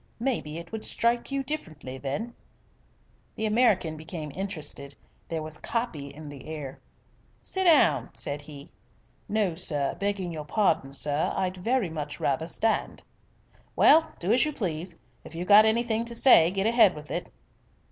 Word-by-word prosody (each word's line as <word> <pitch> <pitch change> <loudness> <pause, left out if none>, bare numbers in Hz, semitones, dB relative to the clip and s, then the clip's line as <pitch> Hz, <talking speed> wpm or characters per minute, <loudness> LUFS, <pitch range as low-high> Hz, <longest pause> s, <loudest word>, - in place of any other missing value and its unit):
Maybe 225 - -2
it 170 0 -9
would 220 -1 -5
strike 235 +3 0
you 275 0 -1
different 225 - -6 0.2
then." 205 - -4 1.0
The 220 - -2
American 210 -8 +2
became 160 -1 -7
interested. 155 -7 -4 0.3
There 160 -2 -3
was 155 0 -7
"copy" 230 -12 -3
in 150 +2 -10
the 145 -2 -10
air. 150 -4 -7 0.6
"Sit 380 0 0
down," 150 - +4
said 145 +1 -3
he. 145 -1 -12 0.6
"No, 205 -4 +1
sir, 150 -5 0
begging 200 -3 -2
your 155 -2 -5
pardon, 155 -7 +1
sir, 145 +2 +1
I'd 185 -1 -1
very 225 -1 0
much 150 -2 -5
rather 140 +4 0
stand." 220 +5 0 0.7
"Well, 320 +1 +5
do 180 +4 -1
as 245 - +4
you 305 0 -1
please. 175 - -4 0.3
If - - -12
you've 175 +2 -4
got 210 +2 +8
anything 225 0 +1
to 235 0 -5
say, 225 -10 +6
get 195 +2 -1
ahead 225 -5 +5
with 150 0 -10
it." - - -4
180 Hz, 155 wpm, -27 LUFS, 150-225 Hz, 1.0 s, got